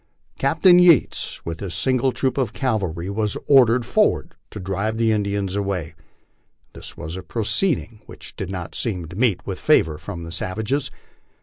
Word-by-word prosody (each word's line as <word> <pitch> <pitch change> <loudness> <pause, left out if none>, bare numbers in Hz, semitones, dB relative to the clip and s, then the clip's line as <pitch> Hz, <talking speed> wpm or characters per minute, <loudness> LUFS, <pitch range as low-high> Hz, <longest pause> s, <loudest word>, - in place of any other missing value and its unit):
Captain 180 -2 +5
Yates, 175 -6 +3
with 80 -1 -5
his 95 -5 -5
single 130 +6 +1
troop 130 0 -1
of 130 -5 -1
cavalry, 95 - -2
was 105 +1 -1
ordered 125 -3 +5
forward - - +1 0.2
to - - -8
drive 100 +4 -2
the 115 -1 +2
Indians 100 -2 -1
away. 95 -6 -2 0.8
This - - -10
was 80 +3 -6
a 95 - -5
proceeding 115 - -1
which - - -11
did 95 - -5
not 90 -4 -6
seem 95 -8 -2
to 90 - -10
meet 110 -4 +1
with - - -5
favor 75 -2 +3
from 90 -4 -7
the 85 - -8
savages. 110 - -2
105 Hz, 165 wpm, -22 LUFS, 90-125 Hz, 0.8 s, Captain